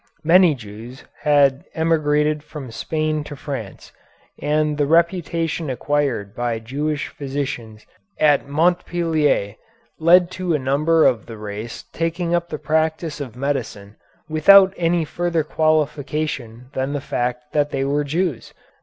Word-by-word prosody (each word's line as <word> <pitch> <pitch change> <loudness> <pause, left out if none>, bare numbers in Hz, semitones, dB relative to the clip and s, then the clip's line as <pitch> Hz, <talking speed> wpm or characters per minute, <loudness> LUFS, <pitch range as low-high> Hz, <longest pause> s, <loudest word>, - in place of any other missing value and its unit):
Many 170 -1 +5
Jews 115 +3 -11 0.2
had 145 -2 +3
emigrated 150 -2 +1
from 145 -5 -9
Spain 155 +5 -2
to 150 - -8
France, 135 -8 -7 0.5
and 150 0 0
the 145 - +2
reputation 165 -1 +1
acquired 130 -6 -1
by 120 -1 -2
Jewish 145 +6 -3
physicians 130 -6 -5 0.3
at 150 -2 +3
Montpellier 160 - +1 0.4
led 175 +2 +5
to 185 -3 -1
a - - +2
number 150 +4 +2
of 115 -5 +2
the 115 - -8
race 105 +2 -7
taking 170 +1 -1
up 170 0 0
the 155 - -4
practice 160 0 -1
of 125 -5 -7
medicine 125 -7 -3 0.3
without 190 +5 +6
any 170 -1 +1
further 170 +1 -1
qualification 150 -5 -1
than 135 +2 -2
the 145 - -1
fact 125 +1 -3
that 145 -1 +2
they 135 - -1
were 145 +2 0
Jews. 155 -3 -2
150 Hz, 130 wpm, -21 LUFS, 130-160 Hz, 0.5 s, without